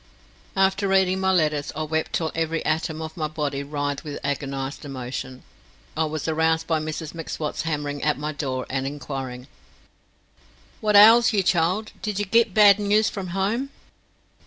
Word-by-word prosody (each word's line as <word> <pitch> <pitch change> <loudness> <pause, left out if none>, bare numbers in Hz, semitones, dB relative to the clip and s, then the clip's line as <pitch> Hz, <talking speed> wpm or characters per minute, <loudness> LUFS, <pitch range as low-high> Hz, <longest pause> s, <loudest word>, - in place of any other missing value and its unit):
After 195 +1 +2
reading 190 -1 +2
my 190 0 +2
letters 150 -5 +1
I 155 - -2
wept 160 +1 -2
till 160 -2 0
every 165 0 -2
atom 160 0 -1
of 160 0 -7
my 155 -2 -2
body 150 -2 -3
writhed 145 0 -3
with 150 -2 -6
agonized 140 0 -3
emotion. 130 -1 -6 0.5
I 160 - +1
was 155 0 -4
aroused 160 0 +1
by 160 -2 +1
Mrs 155 0 -5
M'Swat 155 -3 -4
hammering 145 -2 -3
at 150 -1 +1
my 150 +2 -3
door 130 -4 -3
and 135 0 -2
inquiring: 135 -3 -6 1.3
"What 210 -1 +1
ails 225 +3 +8
ye, 200 -2 +2
child? 185 +5 +1
Did 210 -3 -3
ye 205 - 0
git 230 +2 +3
bad 205 0 +6
noos 210 +1 +2
from 195 -2 -5
home?" 200 +9 -1
160 Hz, 160 wpm, -24 LUFS, 145-190 Hz, 1.3 s, ails